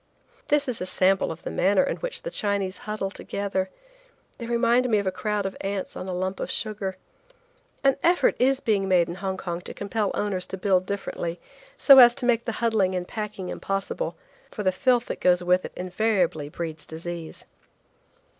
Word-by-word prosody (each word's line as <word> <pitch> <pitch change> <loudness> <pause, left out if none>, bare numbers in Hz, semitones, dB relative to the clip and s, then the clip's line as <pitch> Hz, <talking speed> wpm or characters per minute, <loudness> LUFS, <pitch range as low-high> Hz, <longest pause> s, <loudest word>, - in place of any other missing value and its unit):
This 290 -1 +2
is 245 -6 -2
a 180 - -1
sample 185 0 +2
of 165 - -9
the - - -4
manner 195 +1 +3
in - - -2
which - - -4
the - - -4
Chinese 200 - -1
huddle 205 -2 -2
together. 195 -2 -3 0.7
They 235 - -5
remind 240 +1 +2
me 215 - +3
of 200 - -1
a 190 - +1
crowd 210 +1 -2
of 195 - -3
ants 195 -1 -3
on 185 - -6
a - - -3
lump 185 +1 -2
of - - -3
sugar. 200 -3 -3 0.9
An 275 -1 +4
effort 350 +1 +3
is 265 +1 +3
being 200 -3 +1
made 180 -2 +4
in - - -3
Hong 190 -1 -2
Kong 175 -1 -4
to - - -9
compel 205 0 -1
owners 195 -3 -2
to 190 - -5
build 185 -1 +2
differently, 175 -4 -4 0.4
so 275 -2 +8
as 240 -1 +9
to - - -3
make 235 -1 +2
the 230 - -2
huddling 200 -5 +2
and 180 -1 -3
packing 210 -4 -5
impossible, 195 - -3 0.3
for 210 - -5
the 185 - +3
filth 245 +4 +2
that - - -6
goes 180 0 +3
with 180 +1 +2
it - - -8
invariably 180 -5 0
breeds 160 -1 -5
disease. 165 0 -7
195 Hz, 190 wpm, -25 LUFS, 185-225 Hz, 0.9 s, as